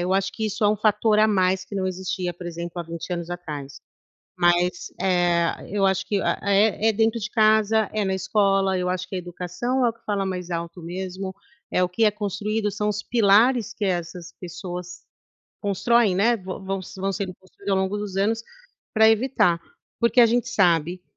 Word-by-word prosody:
eu 185 - 0
acho 195 0 +1
que 220 - -2
isso 215 +1 -4
é - - +5
um 210 - +2
fator 215 +1 +2
a 215 - +6
mais 190 -1 +2
que 200 - -10
não 190 -1 -1
existia, 180 -1 -3
por 175 0 -9
exemplo, 170 0 -6
há - - -3
20 170 +1 -7
anos 170 0 -4
atrás. 150 -6 -7 0.6
Mas, 175 +1 +2
eh, 175 -2 +2 0.2
eu 195 0 +1
acho 190 -1 +1
que, 200 -2 0
ah, - - 0
é 205 +2 +3
é - - +1
dentro 225 +2 +1
de 225 +2 -4
casa, 220 -1 +3
é 215 -1 0
na 190 - 0
escola, 195 0 +2
eu 180 0 -1
acho 185 0 -2
que 190 - -6
a - - -1
educação 180 +9 -2
é - - +4
o - - -5
que 230 - -29
fala 200 -2 -1
mais 180 -2 -4
alto 170 +1 -4
mesmo, 190 +2 -5 0.4
é 180 - +2
o 180 - 0
que 225 +5 0
é 210 - +4
construído, 210 +1 -2
são 210 +1 -1
os 210 0 -3
pilares 225 +1 +3
que 210 - -5
essas 175 -1 -3
pessoas 180 0 -7 0.6
constroem, 205 +1 +2
né, 230 +5 +3
vão 190 -1 -7
vão 195 0 -2
s 185 +1 -10
vão 195 +1 0
sendo 190 -2 -4
construídos 195 +2 -9
ao 190 - +3
longo 190 +2 -1
dos 205 -2 -5
anos 220 +3 +1 0.5
pra 220 0 +6
evitar. 220 -7 +2 0.4
Porque 235 +1 +4
a 235 - +8
gente 240 +2 +1
sabe 175 -4 +2
195 Hz, 205 wpm, -24 LUFS, 180-215 Hz, 0.6 s, a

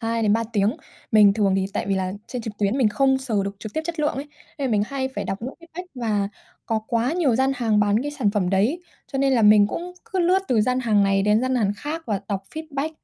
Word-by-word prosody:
2-3 225 -1 +1
tiếng. 210 +1 +1 0.4
Mình 210 -2 +7
thường 200 -3 +2
thì 190 0 0
tại - - -2
vì 195 - +2
là 185 -1 -1
trên 250 -2 -5
trực 220 - -5
tuyến 205 +5 +1
mình 245 -5 +4
không 265 +4 +2
sờ 230 -7 -1
được 200 0 -5
trực 215 0 -7
tiếp 315 - 0
chất 335 -1 -4
lượng 295 - +1
ấy, 280 +2 -6 0.3
nên 275 -2 -1
là - - -1
mình 205 -1 +3
hay 265 0 -2
phải - - -2
đọc 195 - -3
những 255 +3 -5 0.2
feedback 360 +2 -5
và 215 -5 -1 0.4
có 225 -1 0
quá 235 +4 +1
nhiều 325 -8 +2
gian 265 +1 +2
hàng 225 -4 +2
bán 205 +3 +2
cái 290 - -3
sản 260 -9 0
phẩm 200 -4 0
đấy, 220 - +1 0.3
cho 270 - -1
nên 270 0 +2
là 240 -3 +3
mình 210 -1 +7
cũng 350 +11 -5 0.2
cứ 380 - 0
lướt 360 +2 +4
từ 235 -4 +3
gian 255 +4 +1
hàng 215 -5 +3
này 195 0 +2
đến 210 +2 +3
gian 255 +1 0
hàn 210 -5 +1
khác 310 +7 -5
và 205 -4 -1
đọc 195 -2 -2
feedback, 310 -1 -3
230 Hz, 260 wpm, -23 LUFS, 205-270 Hz, 0.4 s, Mình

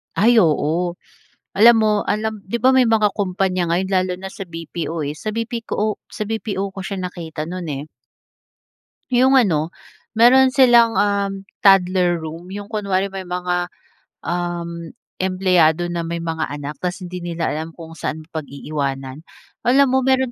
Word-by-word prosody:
Ay 235 +3 +4
oo, 170 -1 +2 0.6
alam 230 +3 +7
mo 215 -1 +3 0.2
alam 215 0 -2
'di 195 +5 -3
ba 260 +3 +4
may 260 - +6
mga 215 -2 +3
kompanya 185 -3 -1
ngayon 180 +3 +1
lalo 185 0 +1
na 190 - -7
sa 190 - -8
BPO 165 -2 -5
eh, 145 - -3
sa 215 +7 -4
BP 230 +1 -3
ko - - -5
o 210 - +2 0.2
sa 215 - -4
BPO 200 -3 -3
ko 195 - -6
siya 195 0 -4
nakita 170 -4 -5
noon 180 +1 -5
eh. 140 0 -4 1.3
'Yong 260 +2 +4
ano, 170 - +2 0.4
meron 255 +3 +6
silang 240 -4 +5
um, 200 -1 0 0.2
toddler 185 -2 +4
room, 160 +2 -8
'yong 205 0 -7
kunwari 200 -2 -1
may 190 -1 -6
mga 180 0 -1 0.6
um, 170 -1 -4 0.3
empleyado 180 -3 +2
na 170 - -2
may 170 0 -4
mga 160 -1 -2
anak 145 0 -6
tas 185 +2 -4
hindi 180 0 -6
nila 170 -1 -3
alam 160 +2 -5
kung 165 -1 -10
saan 155 - -4
pag-iiwanan. 140 -3 -4 0.5
Alam 275 +3 +5
mo 260 - +3
meron 260 -1 +2
185 Hz, 160 wpm, -20 LUFS, 165-215 Hz, 1.3 s, alam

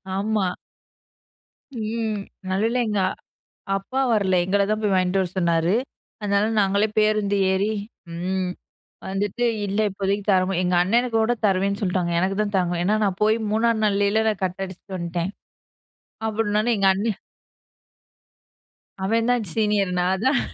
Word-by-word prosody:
ஆமா. 200 -1 0 1.3
ம் 220 -1 -2 0.3
நல்லவேள 220 +6 +1
எங்க 210 -1 0 0.8
அப்பா 255 +7 -4
வரல. 200 -4 +2
எங்களத்தான் 200 +3 +1
போய் 210 -2 +1
வாங்கிட்டு 185 +1 +2
வர 185 - -2
சொன்னாரு. 170 0 +2 0.5
அதனால, 200 0 +2
நாங்களே 200 +2 +2
பேருந்து 215 -1 +2
ஏறி 195 +3 +1 0.4
ம் 180 +2 -2 0.6
வந்துட்டு, 205 +5 -1 0.2
இல்ல 200 0 -3
இப்போதைக்கு 200 +1 -2
தரமா 185 0 +2
எங்க 180 0 +1
அண்ணனுக்கு 230 +4 +1
கூட 225 +2 +2
தருவேன்னு 200 0 +1
சொல்ட்டாங்க. 180 -3 0
எனக்குத்தான் 195 +3 0
தரமாட்டேன்னு 175 -2 0
ஏன்னா, 210 +3 +2
நான் 195 -2 -2
போய் 215 +1 +3
3ஆம் 225 0 +2
நாள்லயே 210 +2 +2
கட் 185 +1 -2
அடிச்சுட்டு 185 +1 -8
வந்ட்டேன். 170 +2 -2 1.0
அப்படின்னொடனே 215 +1 +1
எங்க 195 -1 +4
அண்ணே 210 +3 0 1.9
அவன் 225 +4 +1
தான் 245 -3 0
சீனியர். 210 -4 +1
நான் 185 +3 0
தான் 265 0 +3
200 Hz, 125 wpm, -23 LUFS, 185-215 Hz, 1.9 s, எங்க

